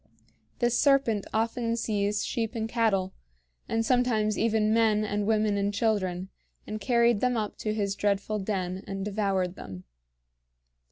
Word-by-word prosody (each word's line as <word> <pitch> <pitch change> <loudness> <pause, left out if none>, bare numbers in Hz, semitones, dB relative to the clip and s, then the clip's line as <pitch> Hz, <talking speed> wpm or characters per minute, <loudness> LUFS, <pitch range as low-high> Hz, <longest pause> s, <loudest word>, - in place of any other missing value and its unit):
This 240 -1 +1
serpent 275 -8 +3
often 230 +1 0
seized 210 -2 -1
sheep 225 0 -2
and 220 -1 -2
cattle, 215 -5 +1 0.6
and 225 0 0
sometimes 225 -4 +2
even 220 -1 +2
men 220 -2 +3
and 205 0 -2
women 215 -2 +2
and 200 0 0
children, 190 -4 -1 0.4
and 215 0 -5
carried 235 0 +3
them 250 0 +1
up 210 -2 -2
to 215 - -2
his 205 -2 -1
dreadful 205 +1 -1
den 190 -2 -3
and 195 0 -4
devoured 195 -3 0
them. 95 - -9
215 Hz, 145 wpm, -28 LUFS, 200-225 Hz, 0.6 s, serpent